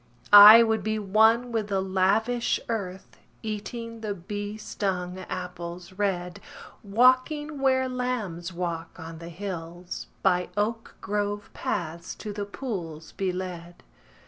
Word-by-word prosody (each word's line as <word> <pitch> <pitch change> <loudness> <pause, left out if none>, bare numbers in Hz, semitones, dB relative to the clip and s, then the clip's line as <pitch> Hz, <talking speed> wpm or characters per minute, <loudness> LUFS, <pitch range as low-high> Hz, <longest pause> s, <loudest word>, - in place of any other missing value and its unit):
I 210 +3 +12
would 220 -1 +1
be 215 0 -1
one 220 +4 +3
with 220 -3 -1
the 195 -2 0
lavish 200 +6 +1
earth, 190 -5 -5 0.3
Eating 230 +2 -5
the 210 -2 -3
bee 205 +3 -5
stung 185 -4 -3
apples 180 0 -6
red: 180 -3 -2 0.4
Walking 255 +8 +2
where 260 -1 +3
lambs 235 -9 -3
walk 170 -1 -5
on 165 -1 -8
the 170 0 -8
hills; 175 -1 -6 0.2
By 180 -2 +2
oak 225 +2 -2
grove 205 +1 -2
paths 170 +1 -4
to 210 -2 -7
the 205 0 -4
pools 175 - -6
be 190 -1 -2
led. 180 -2 -7
200 Hz, 125 wpm, -26 LUFS, 180-225 Hz, 0.4 s, I